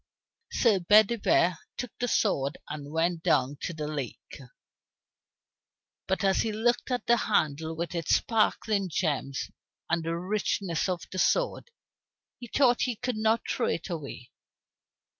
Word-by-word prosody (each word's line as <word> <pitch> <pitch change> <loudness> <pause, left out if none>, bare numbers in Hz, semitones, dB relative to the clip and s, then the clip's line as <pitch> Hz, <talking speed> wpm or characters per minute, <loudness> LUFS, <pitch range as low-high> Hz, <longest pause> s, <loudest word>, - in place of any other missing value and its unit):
Sir 220 -6 +3
Bedivere 205 -2 +4 0.2
took 250 -4 -4
the 245 - 0
sword 140 - +1
and 145 -1 -7
went 165 +1 0
down 145 -5 +1
to - - -3
the 155 -2 -5
lake. 145 -4 -6 1.7
But 190 +2 0
as 195 -1 +3
he 225 - -1
looked 235 +5 0
at 250 -1 -2
the 235 - +4
handle 160 -7 0
with 170 +1 -4
its 170 -3 +2
sparkling 215 -3 +1
gems 145 -5 -2 0.4
and 170 -1 +1
the 165 +1 -2
richness 190 -2 -1
of 180 -2 -2
the 185 - -4
sword, - - +1 0.7
he 240 - -8
thought 245 0 +3
he 250 -2 0
could 250 +2 -3
not 220 +1 +1
throw 245 - 0
it 170 - -2
away. 140 -7 -7
185 Hz, 140 wpm, -28 LUFS, 160-220 Hz, 1.7 s, Bedivere